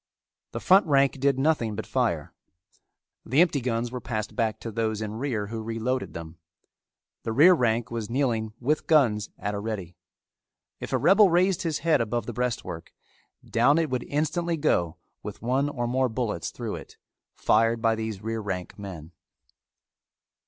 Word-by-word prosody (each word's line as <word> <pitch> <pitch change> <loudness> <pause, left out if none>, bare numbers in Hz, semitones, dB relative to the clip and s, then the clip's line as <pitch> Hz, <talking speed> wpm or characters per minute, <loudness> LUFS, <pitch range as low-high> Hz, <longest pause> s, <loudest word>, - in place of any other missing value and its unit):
The - - -4
front 190 0 +5
rank 140 -2 +3
did 140 0 +2
nothing 135 -7 +1
but 110 - -5
fire. 115 - -1 0.9
The 130 +6 +1
empty 165 -5 +4
guns 120 -1 -1
were 125 -1 -5
passed 110 -3 -4
back 110 -3 0
to 115 - -5
those 110 -1 -1
in 110 -1 -4
rear 120 -6 -1
who 115 0 -4
reloaded 115 +3 -3
them. 85 0 -8 0.8
The 115 - -3
rear 155 +11 +7
rank 120 -6 0
was 115 -2 -4
kneeling 115 -4 0
with 145 +5 0
guns 115 -10 +3
at 105 0 -3
a 100 - -3
ready. 100 -5 -5 0.8
If - - -6
a - - +2
rebel 195 +2 +6
raised 180 +2 +2
his 165 -4 -1
head 160 -6 +4
above 115 +1 -2
the 120 - -5
breastwork, 115 -9 -3 0.6
down 125 +6 +3
it 160 -4 0
would 125 -1 -2
instantly 165 +3 -1
go 85 - +1 0.2
with - - -8
one 130 +4 +1
or 120 -4 -3
more 130 +2 +1
bullets 110 -6 -2
through - - -5
it, - - -12 0.4
fired 115 +1 +2
by 115 0 +2
these 110 -3 -4
rear 115 0 -2
rank 95 -2 -5
men. 90 -5 -8
115 Hz, 165 wpm, -26 LUFS, 110-140 Hz, 0.9 s, rear